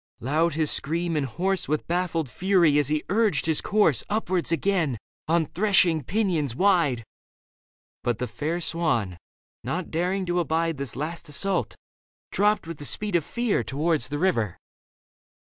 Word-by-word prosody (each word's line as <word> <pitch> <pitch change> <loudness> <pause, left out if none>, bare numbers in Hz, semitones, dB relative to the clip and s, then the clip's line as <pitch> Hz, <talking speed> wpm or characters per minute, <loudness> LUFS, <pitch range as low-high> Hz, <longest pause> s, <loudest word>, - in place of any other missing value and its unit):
Loud 155 +5 +1
his 155 -2 +1
scream 165 +3 -1
and 145 -3 0
hoarse 185 - -1
With 155 +1 -1
baffled 170 -3 -1
fury 175 -1 +3
as 145 - +2
he 150 0 0
urged 205 -5 +1
his 160 -2 +2
course 200 - +2
Upwards 185 -6 0
again 165 -7 +1 0.3
on 165 0 +2
threshing 180 -3 +2
pinions 165 - 0
wide. 170 - +2 1.0
But 120 -3 0
the 125 - -2
fair 150 +8 -3
swan, 120 - -1 0.4
not 180 +1 -3
daring 185 +4 0
to 175 0 0
abide 165 -1 0
This 140 -3 -3
last 160 +4 -5
assault, 150 - -1 0.6
dropped 210 0 +2
with 165 -1 -7
the - - -7
speed 205 - +1
of 170 - +3
fear 235 - 0
Towards 150 +7 0
the 145 - -3
river. 130 - 0
165 Hz, 150 wpm, -25 LUFS, 145-185 Hz, 1.0 s, fury